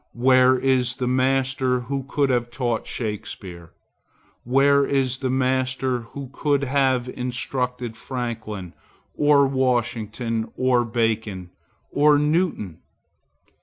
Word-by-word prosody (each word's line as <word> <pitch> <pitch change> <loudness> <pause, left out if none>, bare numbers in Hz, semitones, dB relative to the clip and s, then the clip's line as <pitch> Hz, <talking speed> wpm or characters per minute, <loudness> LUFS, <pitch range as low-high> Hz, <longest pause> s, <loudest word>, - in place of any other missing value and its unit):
Where 130 +1 +5
is 125 -1 +1
the 125 - -2
master 130 0 +1
who 135 +3 -3
could 140 0 0
have 120 -1 0
taught 120 -2 -2
Shakspeare? 95 -6 -6 0.7
Where 140 +3 +4
is 135 -2 0
the 130 - -2
master 130 0 0 0.2
who 135 -2 -7
could 140 -1 0
have 130 -2 +1
instructed 125 -1 -3
Franklin, 115 -7 -5 0.4
or 145 -1 +4
Washington, 120 -3 -1
or 130 -1 +3
Bacon, 110 -5 -2 0.4
or 145 +1 +4
Newton? 150 - 0
125 Hz, 105 wpm, -23 LUFS, 120-135 Hz, 0.7 s, Where